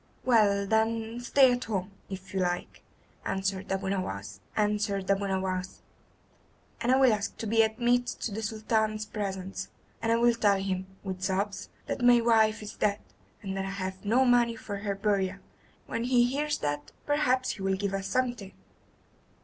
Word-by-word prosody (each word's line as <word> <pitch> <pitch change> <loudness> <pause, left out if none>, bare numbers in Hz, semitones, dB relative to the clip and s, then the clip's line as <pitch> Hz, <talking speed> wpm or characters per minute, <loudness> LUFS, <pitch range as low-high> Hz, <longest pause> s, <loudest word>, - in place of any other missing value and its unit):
"Well, 205 -5 +4
then, 225 +2 0
stay 260 +1 +5
at 245 - -3
home, 195 -3 -2 0.2
if 190 0 -8
you 190 - 0
like," 175 -1 -2 0.4
answered 190 0 -2
Abu 195 0 -1
Nowas, 100 - -3 0.2
"and 210 -1 +1 2.0
I 250 +2 +3
will 265 -3 +5
ask 210 0 -3
to - - -5
be 225 +1 +4
admitted 240 +2 +1
to 230 - -2
the 215 +2 -4
Sultan's 215 0 0
presence, 195 -2 -4 0.3
and 230 0 +2
will 240 0 +5
tell 205 -4 +3
him, 190 -1 -2 0.2
with 190 -2 -5
sobs, 195 +1 -1 0.2
that - - -3
my 245 0 +7
wife 220 -2 +3
is 210 - -7
dead, 205 -1 +1 0.5
and 195 -1 -4
that 195 0 -2
I - - -4
have 190 0 -4
no 240 +6 +3
money 240 -2 +4
for 205 -2 -6
her 200 0 -2
burial. 195 -2 0 0.5
When 230 - -3
he 245 -1 +4
hears 290 +4 0
that 145 0 -3
perhaps 260 -3 +2
he - - -8
will 190 0 +1
give 195 0 -2
us 195 0 -2
something." 245 -6 -1
210 Hz, 160 wpm, -29 LUFS, 195-235 Hz, 2.0 s, my